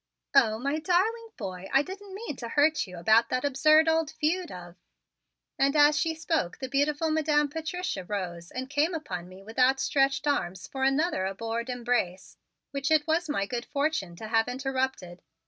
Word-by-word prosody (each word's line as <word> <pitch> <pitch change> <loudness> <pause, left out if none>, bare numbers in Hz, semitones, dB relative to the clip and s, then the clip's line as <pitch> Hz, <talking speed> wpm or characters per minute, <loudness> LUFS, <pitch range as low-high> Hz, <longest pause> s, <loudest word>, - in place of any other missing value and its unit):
"Oh, 220 -1 +4
my 280 +6 -1
darling 425 +7 +1
boy, 190 -3 -6
I 275 - +4
didn't 385 +3 -9
mean 415 -8 -5
to 235 - -6
hurt 295 -1 +2
you 180 -1 -10
about 220 +7 +4
that 255 +2 -1
absurd 305 +3 +4
old 320 -1 +2
feud 335 +3 -1
of 175 -1 -9 0.4
" - - -54
And 275 +2 +3
as 295 0 +6
she 325 +1 0
spoke 315 - -1
the 260 - -5
beautiful 290 +4 +1
Madam 300 -2 +2
Patricia 320 - -4
rose 175 -3 -5
and 260 +1 -5
came 295 +5 +1
upon 180 - -5
me 185 +1 -13
with 225 +4 -8
outstretched 270 +2 +2
arms 190 -11 -1
for 265 -1 -5
another 270 - +1
abhorred 230 +5 -4
embrace, 240 -7 -2 0.3
which 275 0 -2
it 310 -1 +4
was 330 +2 +1
to - - -2
my 200 -8 0
good 240 +3 -4
fortune 280 - -1
to 215 +6 -8
have 225 0 +2
interrupted. 260 -8 -3
270 Hz, 180 wpm, -28 LUFS, 220-310 Hz, 0.4 s, as